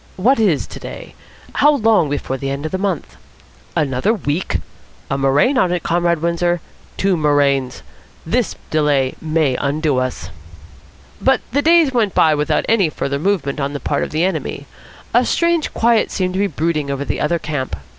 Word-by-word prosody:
What 235 +7 +3
is 190 -10 +2
today? - - -9 0.4
How 295 0 +4
long 215 - +3
before 140 -2 -2
the 135 +1 -4
end 140 +2 -4
of 155 - -3
the 190 - -2
month? 185 - -3 0.6
Another 145 - +1
week! 165 -2 -2 0.5
A - - +1
murrain 140 - +2
on 180 -5 +2
it, 180 -2 -1
Comrade 170 -1 +1
Windsor. 175 +1 +1 0.4
Two 195 -1 +2
murrains. 140 -4 +1 0.4
This - - 0 0.2
delay 145 -4 +2
may 155 -4 +1
undo 145 -1 0
us." 130 0 -4 0.9
But 265 0 +3
the 285 +4 +2
days 325 -3 +4
went 220 -5 +1
by 155 - +5
without 150 0 0
any 205 -7 +3
further 140 -1 -3
movement 160 -6 -1
on 140 0 -2
the 145 - -4
part 145 - -1
of - - -3
the 155 +2 0
enemy. 190 +1 -2 0.5
A - - +5
strange 335 -2 +1
quiet 230 -1 +2
seemed 185 -2 -2
to 190 - -2
be 200 - +2
brooding 155 -3 -1
over 140 0 -2
the - - -3
other 170 +3 +1
camp. 150 -5 -4
160 Hz, 175 wpm, -18 LUFS, 140-195 Hz, 0.9 s, by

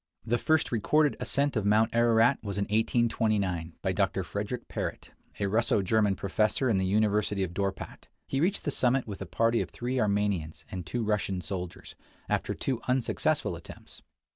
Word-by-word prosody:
The 120 +1 +1
first 160 -1 +2
recorded 145 +6 +2
ascent 140 0 0
of 110 - +1
Mount 105 +2 +3
Ararat 115 +2 +4
was 100 -2 -4
in 100 - +1
1 - - -14
829, 105 -7 +1
by 95 - +1
Dr. 95 0 0
Frederick 105 +7 -4
Parrot, - - -5 0.3
a 100 - 0
Russo 105 0 +2
German 105 0 +2
professor 105 +7 +1
in 95 - +2
the 95 - 0
University 105 0 +1
of 85 -2 -4
Dorpat. 95 0 -4 0.2
He 135 - -1
reached 190 +5 +1
the 145 - -1
summit 130 0 +1
with 100 -3 -7
a 95 - -5
party 115 +4 +2
of - - -4
three 125 +2 -3
Armenians 100 -8 0
and 90 -2 -5
two 115 +6 -2
Russian 105 -3 0
soldiers, 90 +1 -6 0.3
after - - -1
two 130 -4 -2
unsuccessful 125 -1 0
attempts. - - -11
105 Hz, 175 wpm, -29 LUFS, 95-120 Hz, 0.3 s, Ararat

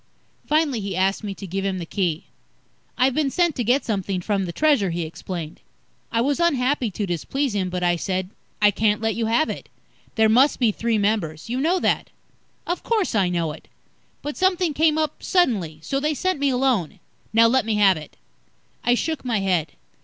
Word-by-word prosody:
Finally, 300 -5 +2
he 195 -2 -4
asked 195 +3 +1
me 200 -2 -4
to 195 - -8
give 195 +2 -3
him 195 -1 -1
the 175 - -5
Key. 170 -3 -1 0.7
"I've 255 +1 +3
been 295 0 +1
sent 345 +1 +1
to 245 - -1
get 250 +5 +2
something 195 -3 -1
from 195 +1 -1
the 175 - -4
Treasure," 280 - +2
he 170 0 -2
explained. 165 0 -6 0.5
I 230 - +1
was 285 +5 0
unhappy 270 -6 +1
to 205 +1 -3
displease 220 - -2
him, 190 -3 -1
but 180 0 -3
I 175 -1 +2
said, 185 +2 -3 0.3
"I 210 -1 +5
can't 210 +1 +1
let 225 0 0
you 225 +2 -1
have 235 +8 +2
it. - - -6 0.5
There 220 -1 +4
must 255 +7 +4
be 235 -4 +3
three 230 +1 -1
members. 200 -3 -1
You 255 +2 -1
know 345 +5 +2
that." - - +1 0.6
"Of 350 - -2
course, 435 - 0
I 195 -5 +2
know 170 -3 -1
it. 150 - -12 0.6
But 295 0 -5
something 365 -3 +2
came 310 +1 +3
up 310 -1 -2
suddenly, 215 - +1
so 275 - -1
they 300 +2 0
sent 370 0 -1
me 285 0 +2
alone. 250 - 0 0.3
Now, 225 +1 +5
let 260 +2 +3
me 220 0 -1
have 200 -2 +5
it." 155 -1 -10 0.7
I 245 - +3
shook 315 +4 -2
my 235 -4 0
head. 180 -5 0
220 Hz, 200 wpm, -23 LUFS, 190-280 Hz, 0.7 s, I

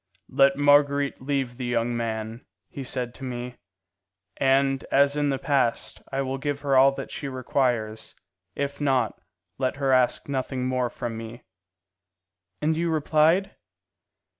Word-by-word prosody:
'Let 135 0 +4
Marguerite 145 -1 +3
leave 130 -3 -2
the 130 - -4
young 120 0 0
man,' 110 0 -4 0.3
he 140 - -6
said 125 -2 -3
to 135 - -11
me, 125 -1 -5 0.8
'and, 135 0 +2
as 140 +1 +4
in 145 -1 +1
the 135 - 0
past, 135 -3 0
I 135 0 -1
will 135 0 -3
give 140 +1 -3
her 140 -2 +1
all 135 +1 +7
that - - -7
she 140 - -5
requires; 125 -4 -1 0.4
if 140 0 -3
not, 135 -3 +1 0.4
let 130 -1 0
her 140 -1 0
ask 130 -1 +2
nothing 130 -2 -2
more 125 -1 0
from 115 -1 -5
me.'" 115 +2 -9 1.2
"And 155 +1 +2
you 170 +1 0
replied?" 160 +5 +2
135 Hz, 145 wpm, -25 LUFS, 125-140 Hz, 1.2 s, all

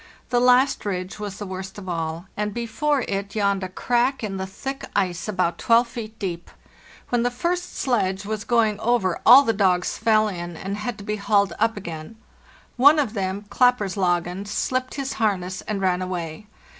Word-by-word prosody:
The 245 - +2
last 250 +2 +4
ridge 185 -1 -4
was 205 -2 -5
the 205 - -5
worst 190 +1 -7
of 195 -2 -9
all, 165 0 -3
and 210 -1 -3
before 260 +5 0
it 200 +1 -3
yawned 200 -2 +1
a 185 - -4
crack 245 +6 0
in 195 -2 -3
the 190 0 -4
thick 270 +8 -6
ice 180 -2 0
about 185 -4 0
12 235 +1 +4
feet 225 -2 -8
deep. 175 -5 -5 0.6
When 240 -1 +1
the 245 - +2
first 350 +8 -2
sledge 195 -7 0
was 215 0 -3
going 225 -3 +2
over 220 -7 +1
all 255 +4 +10
the 225 - +1
dogs 185 -4 +1
fell 215 -1 +3
in 175 -4 -5
and 195 +4 -4
had 210 +1 -4
to 200 - -9
be 210 +1 -2
hauled 200 -2 +2
up 225 0 +1
again. 165 0 -7 0.6
One 285 +5 +7
of 270 -8 0
them 195 0 -3
—' - - -30
Klapperslangen'— 195 -6 +1
slipped 255 +5 -2
his 275 -1 -3
harness 190 -3 0
and 210 -2 -2
ran 185 -1 +1
away. 180 +1 -5
205 Hz, 185 wpm, -23 LUFS, 185-240 Hz, 0.6 s, all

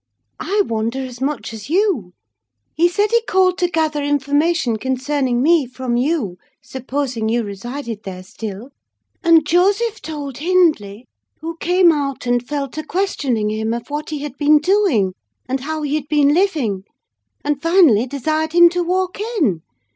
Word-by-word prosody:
"I 410 +1 +1
wonder 230 +3 -2
as 250 -1 -10
much 265 -6 -3
as 220 +3 -9
you. 335 - +1 0.6
He 340 +2 +3
said 410 +4 0
he 470 0 +4
called 370 -1 +2
to 355 - +1
gather 315 -3 0
information 290 -2 +1
concerning 260 0 -1
me 320 -3 +3
from 250 -1 -3
you, 245 - -1 0.2
supposing 260 -3 -3
you 235 +1 +1
resided 230 +3 -6
there 185 -2 -8
still; 215 +5 -8 0.5
and 330 -3 +5
Joseph 405 +7 +2
told 290 -5 -6
Hindley, 300 - +1 0.3
who 330 +1 -5
came 355 +1 +4
out 280 -4 -3
and 245 0 +1
fell 280 +2 -3
to 310 +4 -6
questioning 280 - -1
him 220 +1 -1
of 235 +4 -8
what 300 +1 -4
he 300 -2 -4
had 295 -3 -6
been 300 +1 +5
doing, 300 - +2 0.3
and 265 +1 -1
how 310 +3 -4
he 290 -1 -2
had 300 -2 -2
been 295 -1 +3
living; 300 - 0 0.6
and 290 -1 -1
finally, 330 - +4
desired 310 +4 -2
him 345 0 +7
to 355 +1 -1
walk 370 +2 -1 0.2
in. 200 - +1
290 Hz, 160 wpm, -19 LUFS, 240-335 Hz, 0.6 s, him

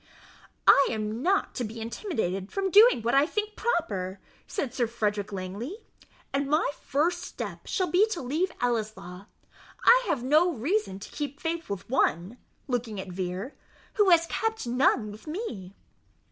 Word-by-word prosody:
"I 280 - +7
am 215 +1 -3
not 385 +6 +1
to 250 - -3
be 225 +1 -6
intimidated 220 - -3
from 390 -1 -1
doing 420 - +7
what 235 - +1
I 275 +2 +5
think 425 +3 -3
proper," 200 - -1 0.3
said 270 - -3
Sir 240 -3 +1
Frederick 210 -3 -2
Langley; 200 - -5 0.6
"and 275 0 0
my 305 0 +2
first 330 +5 0
step - - -7
shall 375 - 0
be 390 +5 +5
to 435 -6 -3
leave 310 +9 -1
Ellieslaw. 215 -6 -3 0.6
I - - +7
have 255 -6 0
no 310 +7 +4
reason 285 - -1
to 195 - -10
keep 290 -1 -5
faith 330 0 -3
with 200 -2 -5
one" 220 - 0 0.3
(looking 240 -5 -2
at 190 - -6
Vere) 185 +7 -4 0.4
"who 415 -3 +4
has 335 -1 +6
kept 445 - -2
none 240 -3 +2
with 215 +8 -13
me." 235 - -5
255 Hz, 160 wpm, -27 LUFS, 210-345 Hz, 0.6 s, I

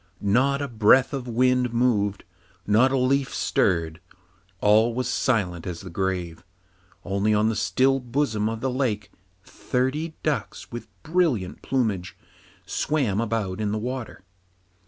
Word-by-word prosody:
Not 135 +7 +2
a - - -2
breath 120 +4 +4
of 130 -2 -4
wind 125 0 +2
moved, 105 -5 +1 0.4
not 115 +6 +4
a 135 - +1
leaf 135 +1 +1
stirred, 85 -1 0 0.6
all 110 +3 +4
was 130 0 -1
silent 90 -9 0
as 85 -2 -5
the 95 -3 -9
grave, 90 -2 -3 0.6
only 100 +2 +1
on 105 +1 +3
the 115 - -1
still 135 +5 +2
bosom 120 -4 -1
of 115 0 -5
the 130 0 0
lake 120 -6 -2 0.3
thirty 140 +10 -2
ducks, 145 -9 -3
with 120 0 -7 0.2
brilliant 155 - 0
plumage, 105 -9 -1 0.5
swam 125 -9 0
about 110 -3 -2
in 105 -1 -1
the 110 - -1
water. 125 -2 -5
115 Hz, 135 wpm, -24 LUFS, 100-130 Hz, 0.6 s, breath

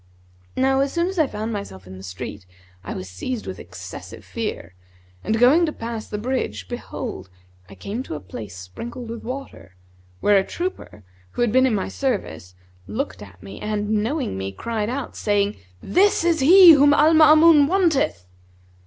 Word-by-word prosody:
Now 265 +1 +2
as 275 0 +1
soon 340 0 0
as 380 -2 -4
I 310 - +4
found 220 0 -4
myself 95 - -7
in 95 +1 -11
the 95 - -11
street, 95 +1 -8 0.4
I - - -6
was 95 - -6
seized 215 - -5
with 95 - -7
excessive 95 +1 -10
fear, 85 +2 -5 0.5
and 220 - 0
going 260 +9 +5
to - - -1
pass 230 -4 -6
the 210 - -5
bridge 210 - -3
behold, 95 0 -6 0.4
I 100 - -12
came 200 - -5
to 210 - -6
a - - -5
place 95 0 -9
sprinkled 230 - -8
with 230 - -7
water,[FN#154] 250 - -8 0.5
where 205 -1 +4
a - - 0
trooper, 345 - -6 0.3
who 240 - +1
been 260 +4 +4
in 235 - +1
my 195 - -2
service, 205 - -3 0.3
looked 100 -2 -4
at 95 -2 -13
me 100 +1 -10
and 210 0 -2
knowing 220 - -1
me, 95 0 -4
cried 215 - -3
out, 265 +2 -5
saying, 205 -1 0 0.3
'This 390 0 +3
is 335 -1 +2
he 350 +6 +9
whom 290 -1 +6
Al 310 +2 +5
Maamun 310 -1 +7
wanteth.' 320 - +1
220 Hz, 175 wpm, -22 LUFS, -, 0.5 s, he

